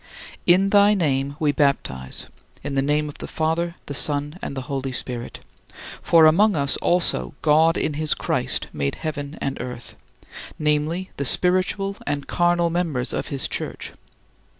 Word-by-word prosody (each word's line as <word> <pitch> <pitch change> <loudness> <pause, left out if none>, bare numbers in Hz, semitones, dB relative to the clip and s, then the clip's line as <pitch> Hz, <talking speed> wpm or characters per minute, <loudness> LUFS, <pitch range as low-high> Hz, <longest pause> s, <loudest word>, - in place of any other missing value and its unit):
In 185 +3 +5
thy 205 0 +6
name 140 -5 0
we 150 -2 +2
baptize, 130 - -1 0.4
in 145 - -4
the 135 - +2
name 150 +2 +1
of 145 - -10
the - - -6
Father, 165 +2 -1
the 145 - -6
Son, 145 +3 0
and 140 - -5
the - - -2
Holy 135 0 -3
Spirit. 125 -1 -4 0.6
For 165 -2 +5
among 200 +7 +5
us 140 -2 +1
also 65 - +1
God 160 +2 +4
in 150 - -1
his 155 +1 0
Christ - - 0
made 70 -2 -2
"heaven 145 -1 -5
and 135 -2 -3
earth," 125 -1 -7 0.6
namely, 155 +4 0
the 140 - -2
spiritual 185 +5 +1
and 145 -1 -2
carnal 175 -1 +1
members 160 -8 -1
of - - -3
his 135 -3 -2
Church. - - -5
150 Hz, 155 wpm, -23 LUFS, 140-170 Hz, 0.6 s, thy